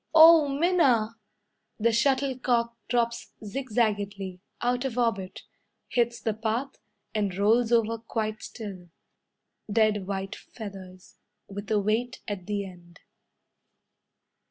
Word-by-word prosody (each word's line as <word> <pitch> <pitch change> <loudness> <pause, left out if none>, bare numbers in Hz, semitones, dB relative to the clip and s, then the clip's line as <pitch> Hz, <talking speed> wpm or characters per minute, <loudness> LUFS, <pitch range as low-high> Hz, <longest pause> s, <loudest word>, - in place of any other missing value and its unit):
"Oh! 320 -1 +9
Minna!" 275 -7 +3 0.6
The 230 +2 +3
shuttlecock 245 -1 +1
drops 235 -1 0
zigzagedly, 205 -6 -1 0.2
Out 245 +1 0
of 255 -3 -3
orbit, 220 -6 -1 0.5
Hits 235 -1 +1
the 220 - -1
path, 225 +5 -2 0.3
And 200 -4 -1
rolls 225 +4 +3
over 230 -1 +2
quite 215 -1 -3
still. 195 -6 -8 0.8
Dead 210 -3 +2
white 195 +1 -3
feathers, 190 -4 -10 0.3
With 200 +1 -7
a 215 -1 +3
weight 220 +4 0
at 195 -4 -5
the 205 -1 -1
end. 175 -2 -14
220 Hz, 110 wpm, -27 LUFS, 200-245 Hz, 0.8 s, Oh